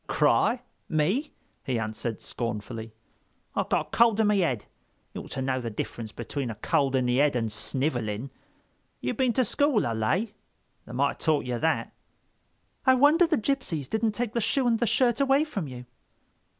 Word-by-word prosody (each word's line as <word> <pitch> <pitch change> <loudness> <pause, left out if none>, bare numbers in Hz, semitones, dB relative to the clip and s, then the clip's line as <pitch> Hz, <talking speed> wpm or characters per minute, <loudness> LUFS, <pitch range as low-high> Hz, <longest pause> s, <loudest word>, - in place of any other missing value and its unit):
"Cry? 245 0 +2 0.3
Me?" 190 - +1 0.3
he 130 -3 -1
answered 110 +1 -4
scornfully. 115 0 -5 0.6
"I've - - -1
got - - +1
a - - -26
cold 230 -2 +5
in 220 - +4
me 205 -2 +3
'ead. 125 -10 -1 0.5
You - - -5
oughter 130 - -5
know 130 -1 0
the 115 - -3
difference 110 +1 -5
between 135 +1 -4
a 115 - -5
cold 135 +5 +1
in 130 -1 +2
the 125 0 +2
head 145 -1 +3
and 115 -3 -1
sniveling. 120 -1 -2 0.7
You 125 - -2
been 255 -3 +1
to 255 +2 +2
school, 285 0 +2
I 115 - -1
lay?—they 190 - -4
might 135 +3 +2
have - - -6
taught 155 -4 +1
you 125 -1 -2
that." 160 +4 0 0.9
"I 260 -1 +6
wonder 300 +7 +5
the 315 -2 +2
gypsies 215 - -1
didn't 220 - 0
take 235 0 -2
the 235 - 0
shoe 255 +5 +1
and 230 -2 +2
the 235 - +1
shirt 245 +3 +2
away 275 +2 +4
from 210 - -4
you?" 125 -1 -8
155 Hz, 180 wpm, -27 LUFS, -, 0.9 s, I